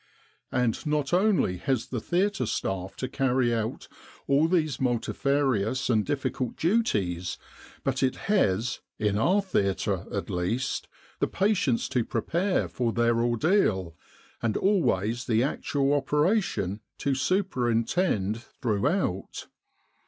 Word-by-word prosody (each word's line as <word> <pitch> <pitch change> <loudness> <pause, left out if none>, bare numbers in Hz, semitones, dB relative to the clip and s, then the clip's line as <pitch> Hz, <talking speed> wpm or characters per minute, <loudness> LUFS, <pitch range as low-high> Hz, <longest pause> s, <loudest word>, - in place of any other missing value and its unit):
" - - -40
And 125 -3 0
not 150 0 0
only 185 - +3
has 130 0 -1
the 120 -4 -3
theatre 195 - 0
staff 95 -1 -3
to 130 - -3
carry 130 -3 +1
out 110 -1 -3 0.4
all 140 +3 +3
these 155 -7 0
multifarious 130 -1 +1
and 110 -2 +3
difficult 130 0 -2
duties, 100 - 0 0.5
but 135 -1 -1
it 130 -1 +2
has 125 - +1 0.2
in 105 -2 0
our 190 - +3
theatre, 100 - 0
at - - -3
least 110 +9 -1 0.3
the - - +2
patients 190 - +1
to 125 -3 +1
prepare 170 - 0
for 120 -2 -1
their 120 0 +2
ordeal, 120 - +1 0.5
and 115 -2 0
always 120 - +1
the 115 -1 +3
actual 140 0 0
operation 145 - +1 0.2
to 140 - 0
superintend 120 - 0
throughout. 120 - -2
130 Hz, 120 wpm, -27 LUFS, 110-155 Hz, 0.5 s, only